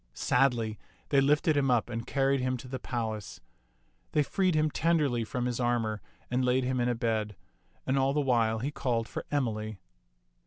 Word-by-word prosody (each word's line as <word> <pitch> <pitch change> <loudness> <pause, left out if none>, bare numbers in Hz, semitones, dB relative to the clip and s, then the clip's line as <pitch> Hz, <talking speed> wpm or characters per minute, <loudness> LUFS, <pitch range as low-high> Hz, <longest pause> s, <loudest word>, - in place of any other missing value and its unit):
Sadly 120 -4 +1 0.3
they 140 -1 +4
lifted 150 +3 +3
him 140 -2 +2
up 120 -3 +2
and 115 0 -5
carried 135 0 +2
him 130 0 0
to 125 - -10
the 130 0 -5
palace. 110 -5 -4 0.7
They 150 - +4
freed 185 +3 +1
him 155 0 +2
tenderly 150 -9 +1
from 125 +2 -3
his 125 -1 -2
armor 115 -4 0 0.3
and 125 +1 +1
laid 125 +1 +2
him 130 0 0
in 120 0 +1
a 120 - +1
bed; 110 -3 -1 0.5
and 135 +1 +1
all 135 +1 +2
the 150 - +1
while 120 -5 +2
he 130 +6 -2
called 120 -5 -1
for - - -6
Emily. 110 -7 -2
125 Hz, 185 wpm, -29 LUFS, 115-135 Hz, 0.7 s, they